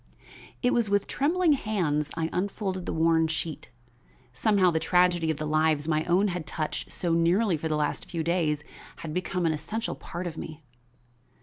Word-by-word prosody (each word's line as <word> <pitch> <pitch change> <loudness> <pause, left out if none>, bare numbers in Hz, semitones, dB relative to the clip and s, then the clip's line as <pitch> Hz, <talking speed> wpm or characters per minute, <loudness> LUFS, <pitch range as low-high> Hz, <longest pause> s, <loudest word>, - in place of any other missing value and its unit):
It 245 - +3
was 235 -4 +1
with 200 0 +2
trembling 325 +4 +2
hands 170 - 0
I 160 -1 0
unfolded 190 -1 -2
the - - -1
worn 160 0 +3
sheet. 160 0 -4 0.6
Somehow 185 +6 +3
the 160 - +1
tragedy 180 -1 +3
of 160 - 0
the 155 - -3
lives 155 -1 +2
my 155 -1 +1
own 185 +4 +3
had 175 -3 -4
touched 155 -1 -4
so 170 -2 -1
nearly 175 +4 +3
for 160 +1 -3
the 155 -1 0
last 150 -1 -2
few 165 -2 -2
days 155 -3 0 0.4
had 155 - -4
become 180 0 -1
an 160 - +2
essential 210 +10 -3
part 175 +2 -7
of 165 -2 -5
me. 155 0 -8
170 Hz, 180 wpm, -27 LUFS, 155-190 Hz, 0.6 s, It